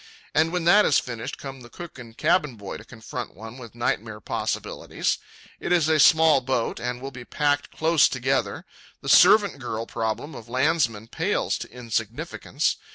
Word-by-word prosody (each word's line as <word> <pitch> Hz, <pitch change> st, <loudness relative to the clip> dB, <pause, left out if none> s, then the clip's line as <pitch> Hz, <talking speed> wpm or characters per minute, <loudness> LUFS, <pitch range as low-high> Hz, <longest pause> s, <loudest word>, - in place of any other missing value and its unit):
And 160 Hz, +2 st, +3 dB
when 180 Hz, -1 st, -1 dB
that 205 Hz, +5 st, +7 dB
is 150 Hz, -, +4 dB
finished, 120 Hz, +2 st, -4 dB
come 135 Hz, -1 st, -8 dB
the 120 Hz, -, -12 dB
cook 170 Hz, 0 st, -10 dB
and 115 Hz, -2 st, -12 dB
cabin 155 Hz, -5 st, +2 dB
boy 100 Hz, -3 st, -7 dB
to -, -, -12 dB
confront 110 Hz, -6 st, -7 dB
one 110 Hz, +6 st, -10 dB
with 115 Hz, -2 st, -11 dB
nightmare 110 Hz, -2 st, -2 dB
possibilities. -, -, -2 dB, 0.4 s
It -, -, -4 dB
is 170 Hz, -4 st, +4 dB
a 160 Hz, -1 st, +3 dB
small 160 Hz, -2 st, +6 dB
boat, 125 Hz, -2 st, -1 dB
and 125 Hz, 0 st, -3 dB
we'll 135 Hz, -, -5 dB
be 125 Hz, -2 st, -9 dB
packed 145 Hz, +3 st, 0 dB
close 160 Hz, -1 st, +3 dB
together. 130 Hz, +1 st, -1 dB, 0.4 s
The -, -, -5 dB
servant 205 Hz, -9 st, +6 dB
girl 115 Hz, -2 st, -4 dB
problem 115 Hz, +8 st, -3 dB
of 115 Hz, 0 st, -10 dB
landsmen 130 Hz, -5 st, +1 dB
pales -, -, 0 dB
to -, -, -7 dB
insignificance. 120 Hz, -2 st, -2 dB
130 Hz, 170 wpm, -25 LUFS, 115-155 Hz, 0.4 s, that